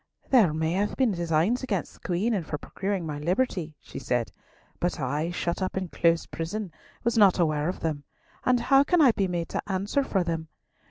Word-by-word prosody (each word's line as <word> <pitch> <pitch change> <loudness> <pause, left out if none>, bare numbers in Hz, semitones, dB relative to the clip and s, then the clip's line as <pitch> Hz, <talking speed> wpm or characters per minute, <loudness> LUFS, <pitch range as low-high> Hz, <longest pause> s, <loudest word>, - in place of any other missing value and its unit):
"There 225 - +6
may 160 +1 -1
have 200 +4 0
been 260 -4 +2
designs 175 +6 +1
against 210 -9 -2
the - - -19
Queen 190 +7 0
and 195 -5 0
for 150 - -4
procuring 190 +3 -3
my 150 -2 -4
liberty," 175 -2 -1
she - - -9
said, 120 -2 -1 0.5
"but 175 -1 -1
I, 145 +5 -1
shut 175 +1 -2
up 185 0 -2
in 185 -2 -2
close 170 0 +2
prison, 180 +4 -4 0.3
was 235 -1 +2
not 200 -3 +6
aware 155 -2 +1
of 185 - -5
them, 155 -3 -2 0.4
and 250 -1 +3
how 270 +3 +5
can 355 +4 +2
I 275 -6 +7
be 195 -3 0
made 175 -2 -3
to - - -2
answer 200 +9 0
for 195 -8 0
them? 165 -2 -3
180 Hz, 205 wpm, -27 LUFS, 160-210 Hz, 0.5 s, I